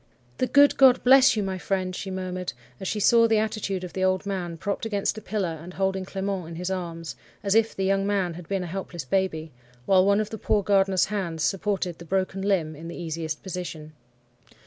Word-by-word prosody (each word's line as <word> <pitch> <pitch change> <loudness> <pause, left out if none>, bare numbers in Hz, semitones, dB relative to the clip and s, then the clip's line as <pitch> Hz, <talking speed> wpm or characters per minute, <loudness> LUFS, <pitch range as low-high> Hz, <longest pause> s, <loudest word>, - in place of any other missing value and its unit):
"'The 255 - +2
good 285 +1 +5
God 260 -2 +6
bless 265 +1 +7
you, 210 - 0
my 190 -1 -3
friend!' 185 -1 -2
she 195 - -5
murmured, 185 -1 -4 0.3
as 190 - -5
she 210 - -1
saw 230 +3 +5
the 225 -1 +3
attitude 210 -3 -2
of 180 - -7
the 185 - -2
old 185 +1 +1
man, 180 -4 -3
propped 200 +5 -3
against 205 -3 -1
a - - -16
pillar, 185 -6 -3
and 180 +2 -10
holding 190 -1 -1
Clement 195 -2 -3
in 165 - -8
his 180 +2 -3
arms, 170 -3 -5 0.3
as 200 -1 +1
if 225 0 +3
the 190 - -1
young 195 +1 +1
man 195 -4 0
had 170 -1 -10
been 195 -2 -1
a - - -4
helpless 175 -3 -6
baby, 160 -1 -1 0.3
while 190 -1 +5
one 200 +1 +3
of 215 -1 -2
the 220 - -6
poor 210 -2 +1
gardener's 195 -2 +3
hands 170 -6 -2
supported 195 -2 -1
the 170 - -10
broken 190 +2 -1
limb 180 -6 0
in 160 +3 -9
the 170 - -7
easiest 160 -2 -4
position. 165 -5 -6
190 Hz, 215 wpm, -25 LUFS, 175-200 Hz, 0.3 s, bless